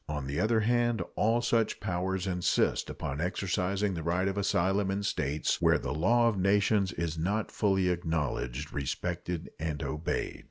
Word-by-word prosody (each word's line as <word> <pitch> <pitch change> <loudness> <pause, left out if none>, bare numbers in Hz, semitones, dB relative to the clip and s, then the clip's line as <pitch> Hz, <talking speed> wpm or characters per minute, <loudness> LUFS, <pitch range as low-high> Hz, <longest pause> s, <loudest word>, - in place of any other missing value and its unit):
On 75 -3 -3
the 70 +4 -2
other 110 +2 +2
hand, 120 0 +2
all 115 +3 +2
such 115 -2 +1
powers 95 -1 -2
insist 90 -2 +1
upon 70 +2 -4
exercising 95 +2 0
the 85 - -4
right 90 +4 0
of 95 - -1
asylum 95 0 +1
in 100 +1 -1
states 75 -5 -1
where - - +5
the - - -3
law 115 +10 +3
of 105 -4 0
nations 100 0 +3
is 85 -2 -3
not 100 +6 -1
fully 95 -3 +2
acknowledged, 80 -5 -2
respected, 85 +4 -3
and 75 -2 -3
obeyed. 75 +2 -3
95 Hz, 160 wpm, -30 LUFS, 80-100 Hz, -, where